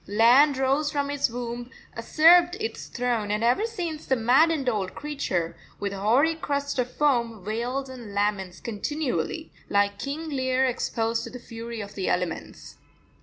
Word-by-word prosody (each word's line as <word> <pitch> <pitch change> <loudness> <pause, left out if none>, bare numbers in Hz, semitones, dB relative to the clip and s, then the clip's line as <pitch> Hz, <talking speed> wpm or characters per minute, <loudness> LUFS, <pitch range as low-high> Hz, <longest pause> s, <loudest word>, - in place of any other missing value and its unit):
Land 245 +7 +5
rose 275 +3 +1
from 285 -1 -1
its 285 -3 +1
womb, 240 0 -5 0.3
usurped 345 +9 +5
its 445 +1 -4
throne, 240 -4 -1
and 210 +2 0
ever 250 - +3
since 345 -9 -4
the 265 - +3
maddened 270 +5 +3
old 205 -6 -1
creature, 195 - -2 0.2
with 200 -1 -3
hoary 235 +11 +3
crest 285 -3 -2
of 250 0 0
foam, 235 -8 0
wails 245 +5 -2
and 245 -5 -9
laments 200 -3 -1
continually, 295 +7 -3 0.2
like 200 0 +2
King 310 +3 -4
Lear 260 -2 +1
exposed 230 -2 -1
to - - -7
the 250 - -8
fury 230 -1 -7
of 205 0 -8
the 190 - -2
elements. 180 -2 -3
245 Hz, 155 wpm, -26 LUFS, 220-285 Hz, 0.3 s, Land